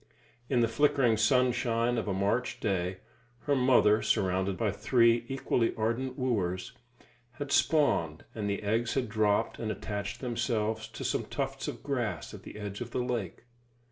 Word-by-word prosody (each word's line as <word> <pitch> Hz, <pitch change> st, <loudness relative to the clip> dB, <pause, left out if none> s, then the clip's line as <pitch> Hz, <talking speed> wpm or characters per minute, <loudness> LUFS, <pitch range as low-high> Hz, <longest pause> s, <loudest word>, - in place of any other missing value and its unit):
In 125 Hz, -3 st, +3 dB
the 115 Hz, -, +4 dB
flickering 135 Hz, -1 st, +3 dB
sunshine 120 Hz, +1 st, +2 dB
of 110 Hz, -, -4 dB
a -, -, 0 dB
March 100 Hz, +6 st, 0 dB
day, 95 Hz, -2 st, -1 dB, 0.4 s
her 145 Hz, -, +1 dB
mother, 125 Hz, -5 st, +4 dB
surrounded 95 Hz, -2 st, +1 dB
by 110 Hz, -3 st, +1 dB
three 115 Hz, +2 st, +3 dB
equally 130 Hz, -3 st, 0 dB
ardent 115 Hz, +4 st, -1 dB
wooers, 95 Hz, -8 st, -1 dB, 0.6 s
had 140 Hz, +2 st, -6 dB
spawned, 85 Hz, -, +2 dB
and 105 Hz, -2 st, -3 dB
the 100 Hz, +1 st, -2 dB
eggs 115 Hz, +3 st, 0 dB
had 130 Hz, -3 st, 0 dB
dropped 105 Hz, -1 st, +1 dB
and 110 Hz, -1 st, -2 dB
attached 100 Hz, -1 st, -4 dB
themselves 115 Hz, -3 st, -1 dB
to 115 Hz, +4 st, -8 dB
some 130 Hz, -, -1 dB
tufts 135 Hz, -1 st, -3 dB
of -, -, -6 dB
grass 120 Hz, -, -2 dB
at -, -, -9 dB
the -, -, -10 dB
edge 105 Hz, 0 st, -6 dB
of 120 Hz, -, -4 dB
the 125 Hz, -, -2 dB
lake. 120 Hz, -8 st, -3 dB
115 Hz, 160 wpm, -30 LUFS, 105-125 Hz, 0.6 s, the